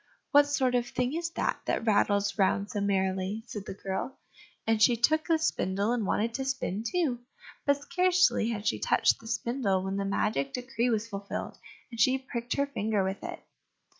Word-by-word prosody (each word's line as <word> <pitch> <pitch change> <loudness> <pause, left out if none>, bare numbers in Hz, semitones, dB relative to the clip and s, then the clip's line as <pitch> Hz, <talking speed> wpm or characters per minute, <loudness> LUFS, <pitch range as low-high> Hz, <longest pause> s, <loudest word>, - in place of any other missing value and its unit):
"What 290 -1 +6
sort 265 -3 +1
of 245 -1 +1
thing 250 +2 -1
is 335 +1 -2
that, - - -1
that - - -1
rattles 200 -2 +2
round 200 +1 +2
so 205 - -2
merrily?" 190 +1 0
said 210 -4 -7
the - - -5
girl, 195 +7 -4 0.5
and 225 -1 +1
she 240 +2 +6
took 310 +7 +2
the 330 -2 +4
spindle 200 - 0
and 225 -5 -1
wanted 225 +2 0
to 265 - -2
spin 240 -6 -2
too. 285 -3 0 0.5
But 285 0 +2
scarcely 360 -7 +3
had 215 -3 -4
she - - +1
touched - - +3
the 225 - -12
spindle 235 -5 0
when 190 +1 -2
the 200 - -1
magic 195 -8 0
decree 250 -1 -1
was 225 -1 0
fulfilled, 200 -2 -6 0.3
and 230 - -8
she 255 +4 +4
pricked 245 -3 -4
her 280 - +2
finger 215 -7 -1
with 190 +1 -3
it. - - -6
230 Hz, 190 wpm, -29 LUFS, 200-265 Hz, 0.5 s, What